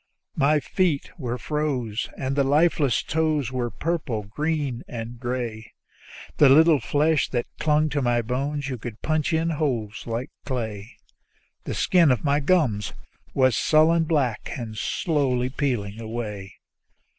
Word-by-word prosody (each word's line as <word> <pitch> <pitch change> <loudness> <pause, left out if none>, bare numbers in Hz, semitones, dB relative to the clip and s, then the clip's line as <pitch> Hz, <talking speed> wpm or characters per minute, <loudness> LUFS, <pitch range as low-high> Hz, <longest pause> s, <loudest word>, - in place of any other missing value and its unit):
My 150 +2 +3
feet 165 0 0
were 125 -3 -3
froze, 130 -7 -2
and 135 0 -2
the 140 - +3
lifeless 145 -2 +2
toes 155 -5 0
were 125 -2 -2
purple 140 -5 -2
and 100 - -17
green 150 -4 -2
and 115 0 -7
gray; 120 -3 -4 0.6
The 145 - +7
little 155 +2 +6
flesh 150 +4 +1
that 120 -2 -1
clung 150 0 +3
to 145 -1 -1
my 120 -2 +1
bones, 140 +4 -2
you 130 -3 -4
could 115 -1 -8
punch 155 +1 0
it 160 - +2
in 165 +1 0
holes 125 -9 -2
like 115 +2 -3
clay; 115 -4 -5 0.7
The - - -3
skin 170 -6 +4
on 125 - +3
my 145 -1 +2
gums 140 - +1 0.4
was 130 -3 +4
a - - +1
sullen 160 +2 +4
black, 135 -9 0
and 115 -3 -6
slowly 130 0 0
peeling 115 -8 -2
away. 105 -4 -5
135 Hz, 150 wpm, -24 LUFS, 120-150 Hz, 0.7 s, The